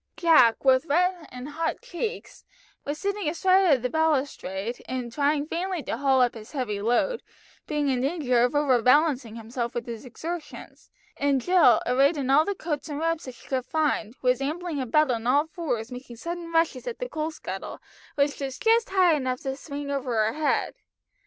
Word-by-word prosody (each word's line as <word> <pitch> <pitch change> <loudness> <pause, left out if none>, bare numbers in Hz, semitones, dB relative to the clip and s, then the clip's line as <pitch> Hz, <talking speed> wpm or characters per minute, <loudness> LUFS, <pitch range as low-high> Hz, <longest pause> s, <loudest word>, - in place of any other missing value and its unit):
Jack, 310 -9 +5
with 260 +3 +4
red 355 +2 +1
and 250 +3 -7
hot 325 +2 -2
cheeks, 445 -1 -5 0.4
was 290 +1 -3
sitting 400 -2 -2
astride 370 0 +4
of 255 - -5
the 250 - 0
balustrade 265 -9 -1
and 250 -2 -4
trying 290 +1 +1
vainly 350 +1 -3
to - - -3
haul 265 0 +3
up 245 - +1
his 220 +2 -11
heavy 220 -8 -2
load, 245 - +1 0.5
being 295 -2 -1
in 255 -2 +1
danger 270 -4 +1
of 245 +4 +2
over 270 -5 +3
balancing 255 -3 +3
himself 235 +1 -5
with 240 - -3
his 230 -2 -7
exertions, 315 +6 -8 0.3
and 280 -1 +2
Jill, 330 -4 +4
arrayed 275 +5 +3
in 270 -2 -1
all 300 +3 +5
the 405 - -2
coats 315 -3 -4
and 290 - -4
wraps 330 0 -1
that 255 -2 -8
she - - -17
could 260 -2 -1
find, 260 -6 -1
was 250 +1 +2
ambling 315 +2 -3
about 270 +3 +2
on 230 -1 -2
all 285 +4 +4
fours 265 -8 -4
making 250 -1 -9
sudden 335 +6 -6
rushes 330 +8 +1
at 480 - -4
the - - -4
coal 315 -8 -3
scuttle, 315 - -7 0.4
which 285 0 +1
was 270 -2 -4
just 455 0 +2
high 370 -3 +4
enough 255 -4 -1
to 270 0 -3
swing 285 0 -6
over 265 -4 -2
her 220 0 +2
head. 305 0 0
285 Hz, 190 wpm, -26 LUFS, 250-330 Hz, 0.5 s, Jack